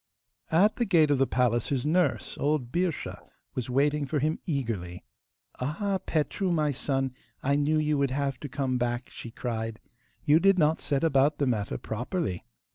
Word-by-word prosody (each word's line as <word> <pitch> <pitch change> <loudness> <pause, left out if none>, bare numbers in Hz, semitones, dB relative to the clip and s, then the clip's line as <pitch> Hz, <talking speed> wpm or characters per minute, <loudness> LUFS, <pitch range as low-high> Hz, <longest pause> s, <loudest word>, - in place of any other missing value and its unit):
At 195 +7 +4
the 240 - +1
gate 165 -7 +4
of 140 - +2
the 135 - +3
palace 120 -2 +1
his 135 -2 -1
nurse, 175 +4 +1
old 145 -4 0
Birscha, 175 -2 -1 0.3
was 125 -1 -4
waiting 145 +3 +1
for 150 - -1
him 155 +3 0
eagerly. 110 - -3 0.6
'Ah, 190 +9 -1
Petru, 165 +5 0
my 155 -3 +2
son, 135 -1 -1 0.3
I 140 +1 +2
knew 145 +2 +2
you 150 -1 +1
would 140 -1 +2
have 140 0 -2
to 145 - -6
come 130 -1 -1
back,' 120 +1 -2
she 115 - -8
cried. 115 -2 -4 0.5
'You 155 +1 +6
did 195 +1 +4
not 155 -1 +3
set 140 0 0
about 145 -1 +3
the 145 - +1
matter 110 -5 -1
properly. 120 - -3
140 Hz, 175 wpm, -28 LUFS, 125-155 Hz, 0.6 s, You